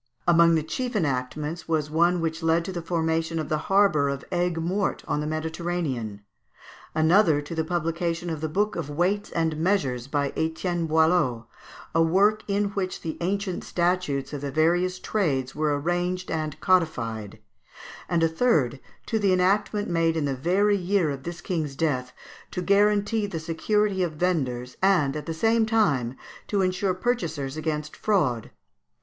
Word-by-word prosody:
Among 170 -1 +6
the 160 - +1
chief 245 +9 -3
enactments 150 0 -2
was 155 -2 0
one 170 +2 +3
which 160 0 -2
led 165 +1 +2
to 190 - -4
the 175 -2 -4
formation 165 -1 -1
of 155 - -3
the 155 - 0
harbour 195 -8 +4
of 140 0 -4
Aigues 175 -1 0
Mortes 185 +5 -1
on - - 0
the 150 - -2
Mediterranean; 155 -9 -3 0.7
another 160 0 +4
to 145 - -7
the 160 -1 0
publication 170 +1 -2
of 155 -2 -4
the 155 - -2
book 205 +6 0
of 160 -4 -4
"Weights 180 +7 0
and 160 -2 -1
Measures," 145 -9 0
by 140 0 -1
Etienne 165 +1 -1
Boileau, 160 -7 +2 0.5
a 165 - +3
work 200 +6 +3
in 200 0 +1
which 190 -2 -3
the 160 -2 -4
ancient 190 +1 -2
statutes 175 -6 -1
of 145 - -4
the 140 - -3
various 175 +5 +2
trades 140 -11 -1
were 150 -2 0
arranged 175 +3 -1
and 155 -2 -3
codified; 120 - 0 0.7
and 170 -2 +2
a - - +5
third 160 - +1 0.3
to 225 - 0
the 200 -2 +2
enactment 200 +3 +2
made 165 -1 +1
in 155 - 0
the 140 - 0
very 195 +9 +2
year 180 -4 +1
of 135 -1 -5
this 170 +4 -7
king's 155 -6 -3
death, 130 -4 -1 0.4
to 180 - -4
guarantee 205 +2 +2
the 170 -5 -4
security 190 +5 0
of 175 -3 0
vendors, 130 -8 -1
and, 180 -8 +3
at 150 - -5
the - - -2
same 225 +7 +2
time, 155 - +1 0.3
to 200 -2 +1
ensure 185 0 0
purchasers 165 - -2
against 150 -1 -3
fraud. 145 - 0
165 Hz, 165 wpm, -25 LUFS, 150-185 Hz, 0.7 s, Among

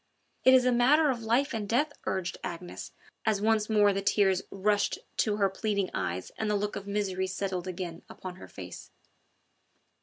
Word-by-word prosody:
"It 260 0 +8
is 255 -1 +5
a 250 - +4
matter 275 +5 +5
of 240 -3 -4
life 245 +6 +1
and 210 -3 -3
death," 290 +6 +2
urged 185 -1 -2
Agnes, 175 0 -6 0.3
as 215 -3 +2
once 215 0 +2
more 205 -2 +4
the 195 - -1
tears 195 -2 +3
rushed 205 +1 +1 0.2
to 210 -2 +2
her 200 -2 +3
pleading 200 0 -1
eyes 90 +1 -3
and 220 - 0
the 210 - +2
look 205 +1 -1
of 200 - -6
misery 195 -2 -1
settled 190 -1 -3
again 175 -2 -5
upon 185 -1 -8
her - - -10
face. 90 -2 -9
205 Hz, 180 wpm, -29 LUFS, 185-220 Hz, 0.3 s, It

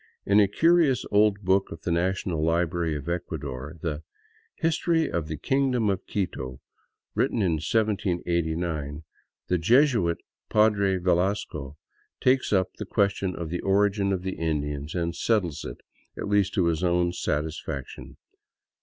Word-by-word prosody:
In 100 +1 +5
a 100 - +5
curious 160 - +3
old 105 0 +4
book 95 0 +2
of 80 - -8
the 90 - -1
National 85 -1 0
Library 85 0 +1
of 75 +1 -6
Ecuador 75 -4 -4
— - - -26
the 80 -3 -2 0.3
" 450 0 -36
History 165 0 +1
of 85 -3 -2
the 80 -1 -4
Kingdom 125 - +1
of 95 - -4
Quito," 65 -10 -3 0.5
written 110 - +1
in 80 -5 +1
1789, 85 -7 -1 0.4
the 90 - +1
Jesuit 115 - +3 0.3
Padre 100 -3 +3
Velasco 90 -5 -1 0.4
takes 130 +1 +2
up 95 -3 +2
the 105 - -5
ques 100 -2 +2
tion 95 -2 -3
of 85 -2 -5
the 90 - -2
origin 100 0 +2
of 95 -2 -1
the 95 0 -4
Indian 75 -3 -2
and 85 -1 -1
settles 95 -10 0
it - - -7 0.2
— - - -38
at - - -4
least 100 -1 +2
to 95 -5 +3
his 85 0 0
own 90 0 +2
satis 80 -1 -2
faction. 70 -4 -7
90 Hz, 155 wpm, -26 LUFS, 80-105 Hz, 0.5 s, In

